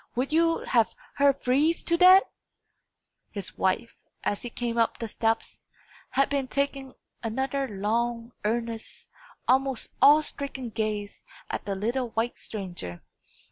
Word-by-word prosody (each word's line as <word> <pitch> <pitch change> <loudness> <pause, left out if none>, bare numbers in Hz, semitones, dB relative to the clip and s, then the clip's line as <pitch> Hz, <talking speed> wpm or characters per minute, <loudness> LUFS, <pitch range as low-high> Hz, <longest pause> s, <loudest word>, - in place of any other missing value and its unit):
Would 265 +5 -1
you 330 0 +3
have 230 -2 +2 0.2
her 280 0 +6
freeze 275 +5 +1
to 335 - +2
death?" 370 +2 +8 1.1
His 200 -3 -6
wife, 225 +5 0 0.3
as 205 - -1
he 245 - -5
came 235 0 -2
up 230 - +2
the 230 - -4
steps, 225 +1 -1 0.5
had 275 +1 +2
been 275 -2 -1
taking 275 -1 -2 0.3
another 265 +4 -1
long, 230 +3 -1
earnest, 230 +1 -3 0.4
almost 265 -1 +2
awe 300 +2 +8
stricken 275 -5 -5
gaze 210 -2 -3 0.3
at - - -4
the 200 -1 -2
little 235 +5 -1
white 225 +2 -2
stranger. 175 - -6
240 Hz, 135 wpm, -27 LUFS, 220-275 Hz, 1.1 s, death